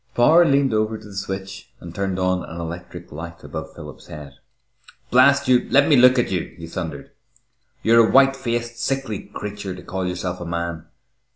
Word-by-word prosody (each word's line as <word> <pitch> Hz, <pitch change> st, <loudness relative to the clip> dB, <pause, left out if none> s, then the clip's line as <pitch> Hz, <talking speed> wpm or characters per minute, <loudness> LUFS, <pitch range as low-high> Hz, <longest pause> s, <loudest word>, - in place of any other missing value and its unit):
Power 160 Hz, +8 st, +6 dB
leaned 140 Hz, -4 st, +2 dB
over 110 Hz, 0 st, 0 dB
to 110 Hz, -, -15 dB
the 100 Hz, -, -12 dB
switch 95 Hz, +1 st, -6 dB
and 85 Hz, -1 st, -10 dB
turned 95 Hz, 0 st, -2 dB
on 90 Hz, 0 st, 0 dB
an 85 Hz, -, -8 dB
electric 85 Hz, +1 st, -8 dB
light 85 Hz, +3 st, -9 dB
above -, -, -7 dB
Philip's -, -, -11 dB
head. 75 Hz, -2 st, -10 dB, 0.8 s
"Blast 140 Hz, +2 st, +5 dB
you, 125 Hz, -1 st, +3 dB
let 140 Hz, +1 st, +4 dB
me 150 Hz, -, +5 dB
look 125 Hz, 0 st, +6 dB
at 120 Hz, -, +1 dB
you!" 90 Hz, -3 st, -3 dB
he 85 Hz, -, -8 dB
thundered. 80 Hz, -4 st, -6 dB, 0.7 s
"You're 115 Hz, 0 st, +5 dB
a -, -, -1 dB
white 135 Hz, 0 st, +5 dB
faced, 120 Hz, -2 st, -3 dB
sickly 130 Hz, -3 st, -3 dB
creature 105 Hz, -2 st, -6 dB
to 90 Hz, -, -11 dB
call 95 Hz, 0 st, -4 dB
yourself 90 Hz, 0 st, -4 dB
a -, -, -5 dB
man! 85 Hz, -1 st, -4 dB
100 Hz, 185 wpm, -22 LUFS, 90-125 Hz, 0.8 s, Power